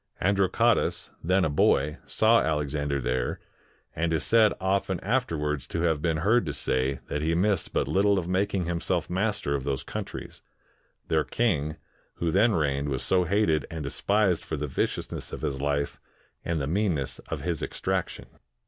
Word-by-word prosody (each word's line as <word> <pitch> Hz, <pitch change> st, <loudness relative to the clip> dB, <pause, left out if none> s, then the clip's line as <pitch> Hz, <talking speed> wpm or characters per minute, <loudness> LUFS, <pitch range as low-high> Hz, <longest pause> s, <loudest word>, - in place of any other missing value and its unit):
Androcottus, 100 Hz, 0 st, +2 dB
then 90 Hz, +2 st, +3 dB
a -, -, +1 dB
boy, 75 Hz, +1 st, +2 dB
saw 115 Hz, +1 st, +4 dB
Alexander 75 Hz, -2 st, -1 dB
there, 60 Hz, -1 st, -1 dB, 0.6 s
and 85 Hz, +1 st, 0 dB
is 80 Hz, -3 st, +1 dB
said 110 Hz, -2 st, +5 dB
often 95 Hz, -1 st, 0 dB
after 120 Hz, -5 st, 0 dB
wards 75 Hz, -2 st, -2 dB
to 85 Hz, -, -3 dB
have 80 Hz, -3 st, +1 dB
been 80 Hz, -1 st, +1 dB
heard 120 Hz, +3 st, +4 dB
to 75 Hz, -, -2 dB
say, 65 Hz, 0 st, 0 dB
that 75 Hz, -, -3 dB
he 80 Hz, +2 st, +1 dB
missed 95 Hz, +1 st, +1 dB
but -, -, 0 dB
little 100 Hz, +1 st, +3 dB
of 85 Hz, -2 st, -2 dB
making 95 Hz, 0 st, 0 dB
himself 85 Hz, 0 st, -1 dB
master 95 Hz, -6 st, 0 dB
of 70 Hz, -2 st, -1 dB
those 70 Hz, -1 st, -2 dB
countries; -, -, -7 dB, 0.7 s
their 80 Hz, -2 st, +2 dB
king, 75 Hz, -11 st, 0 dB, 0.4 s
who 85 Hz, -1 st, -1 dB
then 110 Hz, +6 st, +4 dB
reigned, 70 Hz, -4 st, 0 dB
was 65 Hz, -3 st, -2 dB
so 90 Hz, -1 st, +2 dB
hated 95 Hz, -4 st, +1 dB
and 80 Hz, -2 st, -5 dB
despised 100 Hz, +5 st, +1 dB
for 80 Hz, -, -4 dB
the 75 Hz, -, -2 dB
viciousness 65 Hz, -, -3 dB
of -, -, -6 dB
his 70 Hz, -3 st, -2 dB
life 70 Hz, 0 st, -1 dB, 0.4 s
and 85 Hz, -2 st, -1 dB
the 70 Hz, -, -1 dB
meanness 85 Hz, -4 st, -1 dB
of -, -, -3 dB
his -, -, -2 dB
extraction. 95 Hz, -1 st, -2 dB
80 Hz, 170 wpm, -27 LUFS, 75-95 Hz, 0.7 s, said